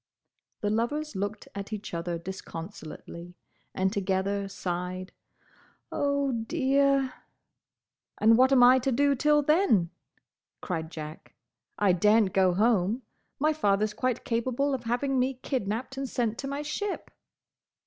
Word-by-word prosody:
—" - - -53
The 205 - +1
lovers 290 +6 -1
looked 205 +2 -4
at 200 +1 -6
each 210 -3 -6
other 170 0 -2
disconsolately, 170 -1 -8 0.4
and 190 +1 0
together 195 0 -1
sighed, 185 0 -4 0.8
"Oh, 280 -1 0
dear!" 275 +2 +1 1.0
"And 225 +1 +5
what 260 +3 +5
am 255 -2 +6
I 255 +1 +7
to 265 +2 0
do 280 +3 +3
till 295 +2 +3
then?" 280 - +3 0.7
cried 160 -3 -4
Jack. 155 -1 -9 0.4
"I 205 -2 +4
daren't 210 +2 +3
go 185 -2 +3
home. 220 +2 +2 0.3
My 305 +2 +2
father 205 -8 +2
's 215 - -5
quite 255 0 -2
capable 255 +4 0
of 250 -3 -3
having 255 +3 0
me 260 +1 +1
kidnapped 250 +1 -3
and 270 -1 -3
sent 230 -2 -1
to 275 - -4
my 280 +2 -3
ship!" 385 +7 -4
225 Hz, 140 wpm, -28 LUFS, 190-270 Hz, 1.0 s, I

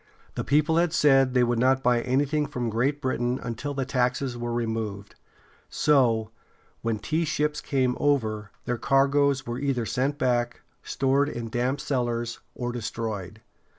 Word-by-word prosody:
The - - -3
people 150 +3 +2
had 170 -1 +2
said 135 -5 +4
they 125 - +5
would 120 -1 +1
not 130 +2 +3
buy 120 -1 +3
anything 145 +4 +1
from 120 -2 -3
Great 135 +6 0
Britain 125 -1 0
until 125 +5 -4
the 135 -1 -1
taxes 125 0 0
were 120 0 -4
removed; 110 -4 -3 0.6
so, 120 -7 +2 0.5
when 115 -1 -1
tea 160 +10 -1
ships 150 -1 -1
came 130 -3 0
over, 110 -8 0 0.2
their 120 -1 -2
cargoes 135 0 +2
were 120 +1 -4
either 135 -4 -1
sent 135 +5 -1
back, 120 -3 0 0.2
stored 140 +2 +1
in 120 -4 -5
damp 125 +4 -1
cellars, 120 -4 -2 0.2
or 120 -1 -3
destroyed. 110 -4 -5
125 Hz, 150 wpm, -26 LUFS, 120-140 Hz, 0.6 s, they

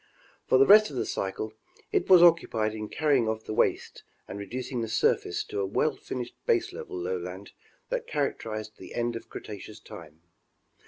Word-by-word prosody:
For - - +5
the 135 - +6
rest 215 +4 +8
of 140 - -9
the - - -1
cycle, 100 +3 -3 0.4
it - - 0
was 180 -2 +9
occupied 115 -11 +4
in 105 -1 -6
carrying 140 -7 +2
off 110 0 -3
the - - -5
waste - - 0 0.3
and 100 - -7
reducing 125 +4 -4
the 115 - -2
surface 110 0 +1
to - - -5
a 100 - +1
well 145 +9 +1
finished 120 -1 -6
baselevel 90 - -1
lowland 90 +2 -5 0.4
that - - -2
characterized 110 -1 -3
the 95 - -10
end 120 0 -1
of 115 - -8
Cretaceous 105 +1 -9
time. 85 -7 -12
110 Hz, 170 wpm, -28 LUFS, 100-125 Hz, 0.4 s, was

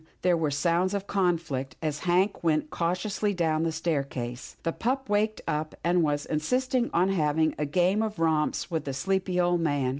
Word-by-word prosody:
there 180 -1 +4
were 160 -2 0
sounds 170 +6 +1
of 200 - -2
a - - -27
conflict, 165 -9 -1
as 150 -2 -2
Hank 185 +4 +1
went 155 -2 +1
cautiously 195 +4 -1
down 160 -3 +1
the 165 0 0
staircase. 140 -7 -3
The 165 - 0
pup 265 +3 -1
had - - -25
waked 215 +1 +1
up, 155 +1 -2
and 175 +1 +3
was 145 -2 0
insisting 250 - 0
on 180 +3 +2
having 155 -3 +2
a 150 - 0
game 180 +7 +2
of 215 -2 -2
romps 160 +1 0
with 160 -3 -2
the 135 - -3
sleepy 190 +2 0
old 175 -1 +2
man. 145 -5 +1
170 Hz, 190 wpm, -27 LUFS, 150-190 Hz, -, there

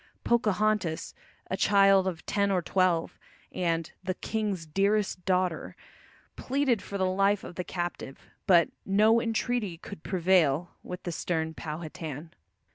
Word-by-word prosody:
Pocahontas, 215 -6 +1 0.4
a - - +1
child 195 -1 +4
of 175 -3 -4
ten 200 -1 +1
or 185 -3 +1
twelve, 180 -3 +1 0.3
and 165 -2 -1
"the 185 0 -2
king's 205 -6 -3
dearest 195 +3 0
daughter," 185 -3 0 0.6
pleaded 260 -5 0
for 200 - -5
the 190 - +1
life 195 +2 +2
of - - -8
the 180 - -4
captive. 175 -7 -5 0.2
But 170 -3 +5
"no 215 +4 +4
entreaty 225 -5 -1
could 155 - -10
prevail" 175 -4 +2
with 180 - -8
the 175 - -3
stern 160 -1 -2
Powhatan. 155 -1 -7
185 Hz, 130 wpm, -28 LUFS, 170-205 Hz, 0.6 s, But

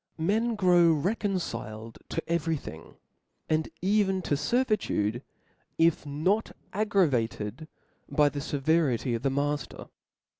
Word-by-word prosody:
Men 220 +8 +1
grow 175 -4 +5
reconciled 145 - -3
to - - -4
every 165 -1 0
thing, 80 - -10 0.5
and 155 0 0
even 195 -1 +2
to - - -1
fcrvitude, 145 - 0 0.6
if 165 -2 +2
not 180 +10 0 0.2
aggravated 155 - 0 0.4
by 150 -1 +4
the 145 0 -5
feverity 145 -4 +1
of 115 - -2
the 135 - +1
xnafter. 145 0 -2
160 Hz, 110 wpm, -28 LUFS, 135-190 Hz, 0.6 s, grow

